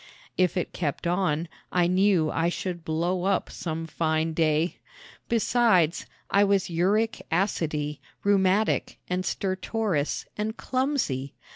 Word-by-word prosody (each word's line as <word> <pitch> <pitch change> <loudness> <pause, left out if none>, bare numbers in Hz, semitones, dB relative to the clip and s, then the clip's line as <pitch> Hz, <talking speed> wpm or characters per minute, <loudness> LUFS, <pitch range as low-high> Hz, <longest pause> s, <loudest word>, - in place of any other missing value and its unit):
If 185 -1 +2
it 180 - -2
kept 155 -3 -3
on 170 -2 +1 0.2
I 180 -1 +3
knew 185 -3 +3
I 165 +1 +1
should 175 -1 -4
blow 175 +3 -1
up 195 0 +1
some 165 -1 -4
fine 160 0 0
day. 160 +1 +1 0.5
Besides, 225 -7 +3 0.2
I 200 - +5
was 195 -3 +2
uric 205 +7 +1
acidy, 155 -5 0 0.2
rheumatic 200 +1 +2
and 180 0 -1
stertorous 190 -4 -1
and 215 +2 -3
clumsy. 245 - -1
180 Hz, 120 wpm, -26 LUFS, 160-200 Hz, 0.5 s, I